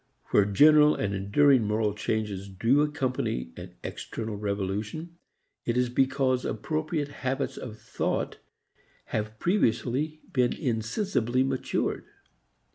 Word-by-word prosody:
Where 100 - +5
general 150 +9 +6
and 100 -1 -1
enduring 120 +8 +4
moral 105 0 +1
changes 105 -2 -2
do 115 +9 +2
accompany 130 - -1
an - - -10
external 110 -2 -5
revolution 105 - -3 0.4
it 120 0 -1
is 125 -1 +2
because 130 0 +1
appropriate 155 -1 -2
habits 135 -1 -2
of 110 -4 -7
thought - - -2 0.7
have 110 0 -2
previously 150 - 0
been 125 -2 +2
insensibly 125 - 0
matured. 135 -1 -1
125 Hz, 110 wpm, -27 LUFS, 105-145 Hz, 0.7 s, general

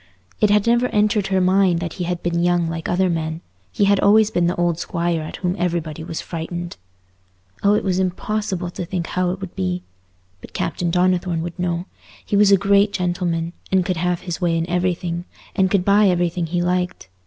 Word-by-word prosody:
It 210 - +4
had 205 0 +3
never 240 +1 +3
entered 210 -2 +1
her 190 -1 +1
mind 185 -1 +3
that 170 -1 -4
he - - 0
had 175 0 -3
been 170 0 0
young 175 -1 +2
like 165 0 -4
other 185 +1 +2
men; 160 -1 -2 0.3
he 205 - +2
had 200 0 +4
always 215 +1 +5
been 175 -3 +2
the 175 - 0
old 175 -1 0
Squire 170 -2 -1
at 155 - -6
whom 180 -1 -2
everybody 165 -3 -2
was 165 -1 -5
frightened. 170 +1 -5 0.9
Oh, 205 +1 +4
it - - 0
was 185 -2 0
impossible 190 0 -2
to 180 - -5
think 175 0 -3
how 180 +1 -1
it 180 +1 -3
would 190 -2 -8
be! 90 -1 -2 0.6
But - - -12
Captain 175 - -2
Donnithorne 180 -1 +1
would 175 +1 -7
know; 175 0 -1 0.4
he - - -1
was 200 0 +5
a 200 - +7
great 200 +1 +3
gentleman, 175 -2 -1 0.2
and 190 -2 +3
could 185 -2 -1
have 180 +1 0
his 175 -1 -5
way 170 -2 +2
in 165 +1 -1
everything, 175 -1 -1 0.3
and 190 -2 +3
could 185 -2 +1
buy 205 +1 +5
everything 175 -1 0
he 175 +2 -1
liked. 180 - -1
180 Hz, 205 wpm, -21 LUFS, 170-190 Hz, 0.9 s, a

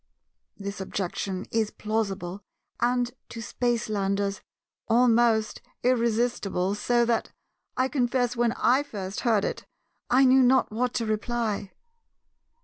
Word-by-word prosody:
This 200 0 -6
objection 190 0 -3
is 220 -2 +1
plausible, 200 -4 -3 0.4
and, 245 0 +1 0.2
to 230 - -8
Spacelanders, 205 -4 -1 0.5
almost 230 -2 +3 0.2
irresistible, 230 -6 +1
so 235 +3 +2
that, 235 -1 0 0.5
I 255 0 +2
confess, 250 -2 0
when 235 -1 +2
I 260 +3 +3
first 200 -8 -6
heard 220 -5 +2
it, - - -4 0.4
I 265 +2 +5
knew 260 +1 +6
not 255 -1 +4
what 245 +3 -1
to 230 - 0
reply. 215 -2 -2
230 Hz, 115 wpm, -26 LUFS, 205-245 Hz, 0.5 s, knew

